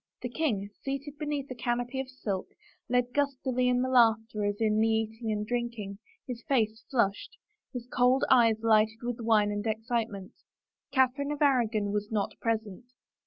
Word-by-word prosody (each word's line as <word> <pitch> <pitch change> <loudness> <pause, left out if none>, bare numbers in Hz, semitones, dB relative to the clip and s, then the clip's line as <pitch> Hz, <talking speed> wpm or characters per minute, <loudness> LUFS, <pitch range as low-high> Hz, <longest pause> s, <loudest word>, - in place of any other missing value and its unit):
The 245 - -2
king, 235 -8 -1
seated 275 +2 -5
beneath 290 -3 -3
a - - -1
canopy 245 +1 -2
of 265 -1 -4
silk, 205 -8 -4 0.4
led 245 0 +1
gustily 260 -3 0
in 250 0 +2
the - - 0
laughter 225 -4 +3
as 205 0 -1
in 215 -1 +2
the 220 - +4
eating 225 0 -1
and 210 0 -1
drinking, 235 -4 -3 0.3
his 245 -2 -6
face 220 -4 +1
flushed, 235 - 0 0.3
his 245 -3 -6
cold 250 +1 +3
eyes 230 -4 +5
lighted 220 0 +3
with 240 0 -3
wine 220 -3 +3
and 205 0 -2
excitement. 220 -3 -2 0.6
Catherine 265 +2 +2
of 295 0 0
Aragon 225 -7 +2
was 210 +1 -2
not 210 -2 -1
present. 220 -1 -2
235 Hz, 165 wpm, -29 LUFS, 215-255 Hz, 0.6 s, eyes